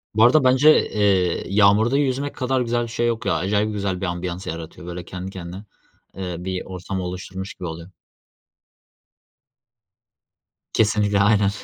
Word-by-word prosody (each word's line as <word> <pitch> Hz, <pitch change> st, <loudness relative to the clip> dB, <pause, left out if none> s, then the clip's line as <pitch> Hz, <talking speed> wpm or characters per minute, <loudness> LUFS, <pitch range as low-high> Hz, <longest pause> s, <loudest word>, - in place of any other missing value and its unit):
Bu 110 Hz, -, +5 dB
arada 130 Hz, +5 st, +6 dB
bence, 130 Hz, +4 st, +5 dB
eee, 95 Hz, -4 st, +1 dB
yağmurda 105 Hz, +5 st, +4 dB
yüzmek 140 Hz, 0 st, -1 dB
kadar 130 Hz, 0 st, 0 dB
güzel 120 Hz, 0 st, 0 dB
bir 115 Hz, -, -5 dB
şey 120 Hz, +1 st, -1 dB
yok 115 Hz, -1 st, -2 dB
ya. -, -, +2 dB
Acayip 105 Hz, +3 st, 0 dB
güzel 100 Hz, -3 st, -2 dB
bir -, -, -1 dB
ambiyans 90 Hz, +1 st, -4 dB
yaratıyor 85 Hz, +2 st, -7 dB
böyle 90 Hz, 0 st, -6 dB
kendi 90 Hz, +1 st, -7 dB
kendine, 90 Hz, +1 st, -8 dB, 0.5 s
eee, 90 Hz, -2 st, -4 dB
bir 95 Hz, +1 st, -3 dB
ortam 95 Hz, +1 st, -5 dB
oluşturmuş 90 Hz, +1 st, -6 dB
gibi 90 Hz, -, -7 dB
oluyor. 85 Hz, +2 st, -8 dB, 2.8 s
Kesinlikle 105 Hz, -2 st, +2 dB
aynen. 100 Hz, 0 st, +4 dB
100 Hz, 145 wpm, -22 LUFS, 90-115 Hz, 2.8 s, arada